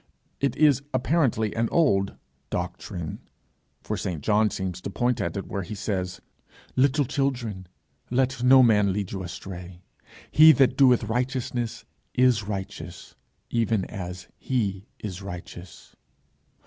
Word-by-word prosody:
It 140 - 0
is 145 -4 +4
apparently 125 -6 +1
an 115 0 0
old 100 - +2 0.3
'doctrine;' 90 -1 -4 0.6
for - - -2
St. 85 -6 -4
John 105 0 +3
seems 95 -2 -4
to - - -5
point 120 +4 0
at - - -2
it 100 - -4
where 100 - -4
he 95 +4 -6
says, 95 -3 -3 0.5
'Little 140 +2 +3
children, 120 -8 -2 0.4
let 130 +1 0
no 130 +1 +7
man 105 -4 +4
lead 100 -1 -3
you 95 - -4
astray; 90 0 -8 0.5
he 155 +1 +9
that 135 -3 +3
doeth 130 -3 +5
righteousness 120 0 -2 0.3
is 125 -4 +4
righteous 95 -2 -6 0.4
even 115 -4 +1
as 90 -2 -7
he 100 -6 -2
is 95 -3 -6
righteous.' 90 -1 -10
110 Hz, 130 wpm, -26 LUFS, 95-130 Hz, 0.6 s, he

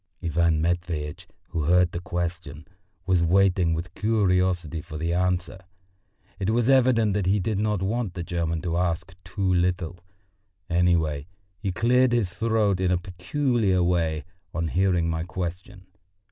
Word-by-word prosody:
Ivan 85 -1 +1
Matveitch, 85 -3 -2 0.2
who 80 -4 -2
heard 90 +1 +4
the 85 - -4
question, 85 -3 -5 0.4
was 95 -3 +2
waiting 90 -1 +3
with 85 +2 -5
curiosity 90 -7 +1
for 75 -2 -8
the 85 +2 -1
answer; 90 0 -1 0.8
it 95 0 -1
was 120 +3 +2
evident 120 -5 +4
that 100 -2 -1
he 100 +2 +3
did 100 +1 -1
not 105 -3 0
want 105 -2 -2
the 85 - -4
German 85 -2 -2
to 85 -1 -1
ask 90 +1 -1
too 95 +1 -1
little; 90 -1 0 0.7
anyway, 85 -4 +1 0.3
he 100 -2 -2
cleared 120 +5 +3
his 105 -7 0
throat 110 -4 +1
in 95 -1 +1
a 90 - +3
peculiar 95 +2 0
way 85 -3 0 0.3
on 80 -1 -1
hearing 90 -1 +2
my 80 -1 -1
question. 90 +2 -6
90 Hz, 145 wpm, -25 LUFS, 85-100 Hz, 0.8 s, heard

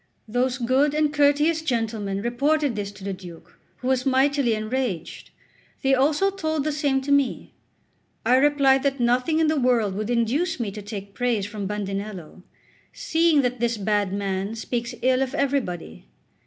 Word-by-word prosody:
Those 250 +3 0
good 270 +4 +2
and 305 -1 +1
courteous 295 +2 +3
gentlemen 220 -7 -2
reported 280 +3 +1
this 200 -1 -4
to 195 - -13
the 195 0 -3
Duke, 175 -2 -12 0.2
who 250 - -6
was 260 -1 +1
mightily 265 -2 +2
enraged; 215 -5 -3 0.5
they 270 0 +3
also 295 +9 +2
told 315 -6 -2
the 305 - 0
same 285 -2 0
to 280 +2 -3
me. 280 -3 +1 0.7
I 250 +3 +5
replied 275 -1 +4
that 275 -1 -1
nothing 250 +6 +2
in 320 - +3
the 310 -1 +1
world 240 -6 +2
would 210 +3 -4
induce 260 +8 0
me 220 -4 -2
to 210 +1 -8
take 200 -1 -8
praise 240 -4 0
from 205 -1 -5
Bandinello, 195 -3 -5 0.5
"seeing 320 -3 +2
that 250 -1 -1
this 235 -1 0
bad 205 -1 0
man 195 +1 -2
speaks 235 +1 -4
ill 255 0 +3
of 270 +1 -2
everybody." 250 - -2
250 Hz, 165 wpm, -24 LUFS, 210-280 Hz, 0.7 s, I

